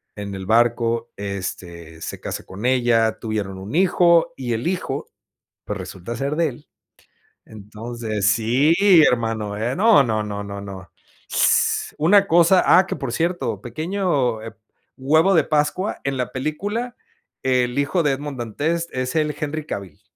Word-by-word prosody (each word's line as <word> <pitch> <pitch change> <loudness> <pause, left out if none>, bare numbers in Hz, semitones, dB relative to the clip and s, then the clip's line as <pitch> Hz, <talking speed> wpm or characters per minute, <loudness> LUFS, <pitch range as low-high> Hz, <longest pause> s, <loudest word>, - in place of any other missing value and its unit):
en 100 -1 -6
el 95 -1 -7
barco, 115 +1 +1
este, 90 -5 -6
se - - -6
casa - - -5
con 100 +5 -8
ella, 120 -3 +2
tuvieron 105 -4 -4
un 100 +8 -7
hijo 170 -2 +4
y 125 -3 -3
el 115 +2 -3
hijo, 180 0 -3 0.5
pues - - -4
resulta 95 +6 -7
ser 140 +5 -2
de 165 0 +2
él. 145 +1 -9 0.8
Entonces, 110 0 -3
sí 120 +7 +2 0.3
hermano, 115 -3 -1
eh, 120 +4 -2
no, 215 -3 +6
no, 110 -4 -1
no 100 -1 -5
no, 100 0 -7
no 95 -2 -9 0.4
s - - +2
una 195 +6 +5
cosa, 175 +1 +5
ah 185 - +6
que - - -4
por 135 -4 -4
cierto, 175 +5 -1
pequeño 145 - -1
eh 115 - -8 0.4
huevo 155 +8 +3
de 165 - +4
pascua, 155 +6 -1
en 135 -1 -1
la 125 -1 -3
película, 205 - -3 0.5
el 125 0 +1
hijo 150 +5 +1
de 145 -3 +2
Edmond 140 0 -5
Dantès 160 +9 -2
es 130 0 -3
él 150 -1 +1
Henry 155 0 -4
Cavill. 95 - -7
125 Hz, 155 wpm, -21 LUFS, 110-155 Hz, 0.8 s, no